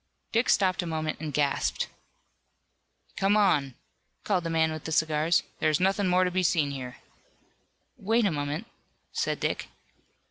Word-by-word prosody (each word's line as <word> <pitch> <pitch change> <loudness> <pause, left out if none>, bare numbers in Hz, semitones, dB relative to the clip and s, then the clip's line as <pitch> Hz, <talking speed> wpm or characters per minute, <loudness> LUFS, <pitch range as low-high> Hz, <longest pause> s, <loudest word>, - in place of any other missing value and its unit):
Dick 230 +2 +1
stopped 185 -2 +3
a 175 - -5
moment 155 -1 -3
and 155 -1 -4
gasped. 140 0 0 1.3
"Come 200 +2 +3
on," 150 - +2 0.5
called 185 -4 0
the 165 - -3
man 160 -1 +2
with 155 -1 -6
the 160 - -4
cigars, 155 +1 +2 0.2
"there 155 - +2
is 155 - +1
nothing 195 +1 +2
more 180 +1 +4
to 180 - 0
be 185 +1 +1
seen 160 -5 +2
here." 125 -2 -7 1.0
"Wait 225 +3 +1
a 195 - +2
moment," 145 +5 -3 0.5
said - - -1
Dick. - - -2
165 Hz, 155 wpm, -27 LUFS, 150-190 Hz, 1.3 s, more